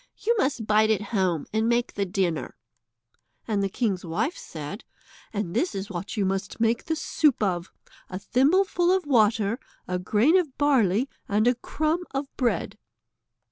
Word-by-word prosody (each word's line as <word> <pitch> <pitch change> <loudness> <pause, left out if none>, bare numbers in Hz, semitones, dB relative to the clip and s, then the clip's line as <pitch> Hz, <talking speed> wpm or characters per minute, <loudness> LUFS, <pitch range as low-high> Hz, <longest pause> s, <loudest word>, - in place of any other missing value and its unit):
You 465 - +1
must 265 - 0
bide 215 +1 +4
at 215 -3 +2
home 185 -7 +1
and 220 +1 +1
make 240 +1 +1
the 200 -1 -1
dinner." 180 -4 -1 0.9
And 210 -3 0
the 195 - 0
king's 200 -4 -1
wife 205 - -1
said: 160 - -8 0.5
"And 205 -5 -3
this 335 - 0
is 195 +1 -5
what 190 +5 -5
you 200 - +1
must 195 +2 -2
make 230 +1 +1
the 320 - -1
soup 300 -5 +1
of, 180 -3 -1 0.4
a 185 - -4
thimbleful 350 - +2
of 375 -3 +1
water, 225 -3 +2 0.3
a 180 0 -1
grain 225 - +3
of 310 -7 -4
barley, 255 -5 +3 0.2
and 210 +2 +2
a 245 - +5
crumb 310 +7 -1
of 275 0 -4
bread." 245 -3 -1
220 Hz, 165 wpm, -26 LUFS, 195-275 Hz, 0.9 s, a